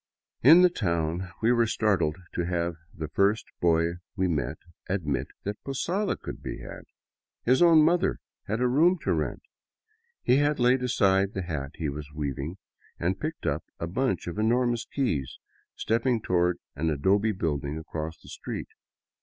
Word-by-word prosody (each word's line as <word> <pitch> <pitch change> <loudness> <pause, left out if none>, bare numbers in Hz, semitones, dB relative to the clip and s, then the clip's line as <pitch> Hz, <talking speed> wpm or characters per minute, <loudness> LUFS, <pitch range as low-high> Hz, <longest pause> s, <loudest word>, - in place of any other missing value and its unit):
In 165 +8 +8
the 180 - +7
town 85 - -1
we 115 - +5
were 120 -1 +3
startled 95 -9 +1 0.2
to 85 -1 -1
have 85 -1 -1 0.2
the 80 -2 -5
first 100 +5 +2 0.2
boy 85 0 +2 0.2
we 95 -3 +1
met 75 -8 -1 0.3
admit 75 -9 -1 0.2
that 105 +1 -5
posada 180 +9 -1
could - - -8
be - - -5
had. - - -9 0.6
His 130 +5 +3
own 165 -3 +7
mother 170 +3 +2 0.3
had 110 +4 -1
a 125 - +4
room 165 +9 +4
to - - +1
rent. - - -2 0.8
He 135 +3 +4
laid 130 -3 +3
aside 100 -6 +2
the 95 - -2
hat 75 -5 -4
he 80 - -3
was 75 +1 -6
weaving 75 +3 -3 0.4
and, 90 +3 0
picking 155 +8 -2
up - - -3 0.2
a - - -2
bunch 95 +3 -1
of 85 +4 -5
enormous 120 +1 +2
keys, 80 - -2 0.4
stepped 115 +1 0
toward 90 -1 +2 0.2
an 80 +3 0
adobe 95 +9 +2
building 75 -6 -2
across 80 0 -5
the - - -15
street. - - -6
95 Hz, 160 wpm, -27 LUFS, 80-125 Hz, 0.8 s, In